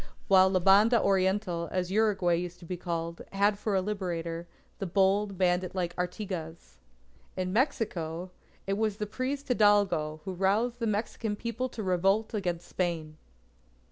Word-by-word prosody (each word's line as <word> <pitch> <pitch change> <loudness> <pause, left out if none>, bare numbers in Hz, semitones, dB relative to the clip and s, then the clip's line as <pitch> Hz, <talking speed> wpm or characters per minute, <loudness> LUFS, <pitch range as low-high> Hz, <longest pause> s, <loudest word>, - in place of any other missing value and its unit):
While 190 -1 +6
La 190 -1 +2
Banda 205 +6 +5
Oriental, 190 -3 +1
as 185 0 -1
Uruguay 200 -4 +2
used 175 +1 -2
to - - -13
be 180 - -4
called, 170 -1 -4
had 200 +1 +2
for 210 -1 -1
a 190 - +2
Liberator, 170 -4 -3 0.3
the 195 - -3
bold 195 +2 +2
bandit 180 0 +1
like 175 -2 -2
Artigas. 180 - -5 0.6
In 185 0 -2
Mexico, 185 - -1 0.3
it 195 +1 -1
was 215 -2 0
the 210 - -2
priest 265 +6 -3
Hidalgo 205 -9 +3
who 190 - -3
roused 210 +7 +1
the 230 - -1
Mexican 215 0 -2
People 235 +4 -3
to 220 - -6
revolt 195 +4 +1
against 175 -5 -2
Spain. 165 -4 -3
190 Hz, 150 wpm, -29 LUFS, 175-210 Hz, 0.6 s, While